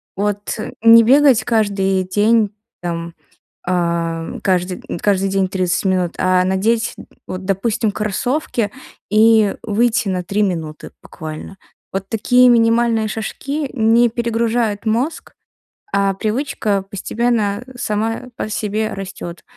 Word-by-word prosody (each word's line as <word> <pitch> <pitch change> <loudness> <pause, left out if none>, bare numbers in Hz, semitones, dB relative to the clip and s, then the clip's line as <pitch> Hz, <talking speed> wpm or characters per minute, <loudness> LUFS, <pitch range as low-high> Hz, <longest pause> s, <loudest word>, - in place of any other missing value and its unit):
Вот 205 +1 -2 0.3
не 230 0 +8
бегать 270 0 +5
каждый 195 -4 +1
день, 210 +2 +2 0.3
там, 170 -1 -4 0.5
а, 170 -2 -1
кажды 180 -1 0 0.2
каждый 195 -1 +1
день 195 0 +1
30 185 -1 -1
минут, 185 -3 0
а 185 0 +3
надеть, 220 +5 0 0.3
вот, 185 +1 -5
допустим, 205 +3 0
кроссовки 215 +1 -1 0.4
и 215 -1 +4
выйти 225 0 +1
на 180 -2 -2
3 205 +4 0
минуты 160 -5 -3
буквально. 160 +4 -8 0.3
Вот 195 0 -4
такие 245 +4 +4
минимальные 230 -1 +3
шажки 275 +7 -4
не 230 +1 +4
перегружают 230 -2 -1
мозг, 245 +9 -1 0.6
а 200 0 +2
привычка 215 -2 -1
постепенно 210 +1 -1 0.2
сама 220 +3 -2
по - - -4
себе 215 +1 -2
растёт. 185 -3 -7
210 Hz, 115 wpm, -18 LUFS, 190-230 Hz, 0.6 s, не